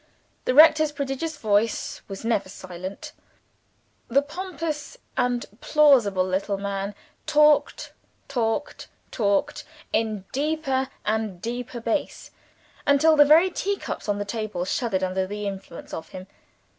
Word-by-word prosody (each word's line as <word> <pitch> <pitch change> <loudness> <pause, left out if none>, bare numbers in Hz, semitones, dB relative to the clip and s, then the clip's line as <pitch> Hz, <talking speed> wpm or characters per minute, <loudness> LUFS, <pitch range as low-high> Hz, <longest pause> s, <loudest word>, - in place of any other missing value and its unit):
The 255 - +1
rector's 310 0 +7
prodigious 285 +2 -3
voice 215 -1 0
was 195 +2 -7
never 210 -5 0
silent: 185 0 -8 1.0
the 275 +4 +3
pompous 325 -2 -5 0.2
and 245 -1 0 0.2
plausible 245 -12 +4
little 195 +2 -1
man 200 0 -3 0.3
talked, 300 -1 +3 0.3
talked, 240 +2 -2 0.2
talked, 200 -4 0 0.3
in 215 -4 -1
deeper 275 -2 -1 0.2
and 215 -4 -1
deeper 240 +3 -5
bass, 230 +4 -3 0.6
until 295 +3 +5
the 290 -1 +7
very 325 +5 +6
teacups 395 - -3
on 205 - +1
the 205 - -3
table 210 -4 -3
shuddered 195 -1 -1
under 185 0 -1
the 205 +1 -5
influence 195 -3 -7
of 160 - -6
him. 185 0 -9
230 Hz, 120 wpm, -25 LUFS, 200-290 Hz, 1.0 s, rector's